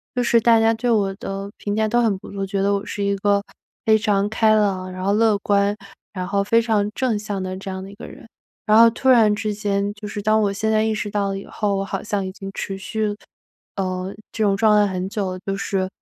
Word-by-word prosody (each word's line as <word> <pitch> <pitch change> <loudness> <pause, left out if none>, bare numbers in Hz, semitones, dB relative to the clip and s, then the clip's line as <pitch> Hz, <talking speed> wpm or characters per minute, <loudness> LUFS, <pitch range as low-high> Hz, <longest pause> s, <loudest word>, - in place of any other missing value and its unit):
就 250 - +1
是 235 -1 +4
大 230 0 +5
家 225 0 +4
对 230 +2 -2
我 200 -3 +2
的 195 0 -6
评 205 0 -3
价 220 0 +1
都 240 +2 +2
很 220 -4 +2
不 - - -11
错， 195 -1 -3
觉 195 0 -2
得 200 +1 +2
我 200 0 -2
是 205 -1 -4
一 200 0 +1
个 200 0 +1 0.4
非 220 0 +5
常 205 -2 +1
开 220 0 +3
朗， 195 -3 0
然 185 0 -6
后 195 - +1
乐 220 -1 +3
观， 200 0 +1 0.4
然 185 -2 -4
后 200 +1 +1
非 230 +3 +3
常 215 -3 +1
正 250 -5 0
向 205 -2 -4
的 185 0 -4
这 195 +1 -7
样 190 0 -5
的 195 - -10
一 - - -13
个 210 - -10
人。 - - -13 0.4
然 215 0 +5
后 230 0 +8
突 260 +3 -1
然 225 -4 +5
之 210 0 -2
间， 200 0 -1
就 210 0 -9
是 205 0 -5
当 215 +1 +3
我 200 -1 0
现 220 +2 -1
在 215 0 +3
意 220 0 0
识 210 - -3
到 200 -1 0
了 195 - -3
以 - - -10
后， 205 -2 -1
我 195 - -1
好 - - -4
像 205 -2 -2
已 190 - -4
经 195 0 -8
持 195 -1 -4
续， 210 +2 -2 0.6
呃， 185 0 -3 0.2
这 220 - -2
种 200 -1 +2
状 215 0 +4
态 205 -1 +2
很 185 0 -3
久 200 -3 -2
了， 185 - -7
就 195 - -1
是 195 -1 -1
205 Hz, 280 characters per minute, -21 LUFS, 195-220 Hz, 0.6 s, 后